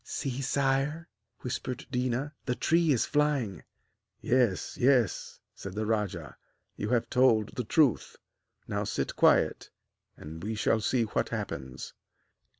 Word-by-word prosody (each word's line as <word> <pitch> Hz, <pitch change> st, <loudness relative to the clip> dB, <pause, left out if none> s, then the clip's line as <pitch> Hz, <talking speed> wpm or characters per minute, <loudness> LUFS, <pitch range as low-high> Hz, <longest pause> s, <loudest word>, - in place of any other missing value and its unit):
'See, 135 Hz, +1 st, -4 dB
sire,' 140 Hz, +5 st, 0 dB, 0.3 s
whispered 125 Hz, 0 st, -4 dB
Déna, 125 Hz, +2 st, -1 dB, 0.2 s
'the 125 Hz, -, 0 dB
tree 165 Hz, +2 st, +2 dB
is 125 Hz, -, +2 dB
flying!' 145 Hz, -, 0 dB, 0.6 s
'Yes, 120 Hz, -7 st, +1 dB
yes,' 125 Hz, -5 st, +1 dB
said 95 Hz, -1 st, -8 dB
the 110 Hz, +1 st, -1 dB
rajah, 95 Hz, -, -2 dB, 0.4 s
'you 105 Hz, -, -3 dB
have 120 Hz, -1 st, +1 dB
told 115 Hz, -4 st, +3 dB
the 125 Hz, -, -2 dB
truth. 130 Hz, -, +2 dB, 0.5 s
Now -, -, -1 dB
sit -, -, -2 dB
quiet, -, -, +3 dB, 0.5 s
and 80 Hz, +2 st, -9 dB
we 110 Hz, +2 st, -3 dB
shall 110 Hz, +1 st, +1 dB
see 120 Hz, +2 st, +1 dB
what 110 Hz, -, -1 dB
happens.' 65 Hz, -1 st, -5 dB
125 Hz, 130 wpm, -29 LUFS, 105-135 Hz, 0.6 s, told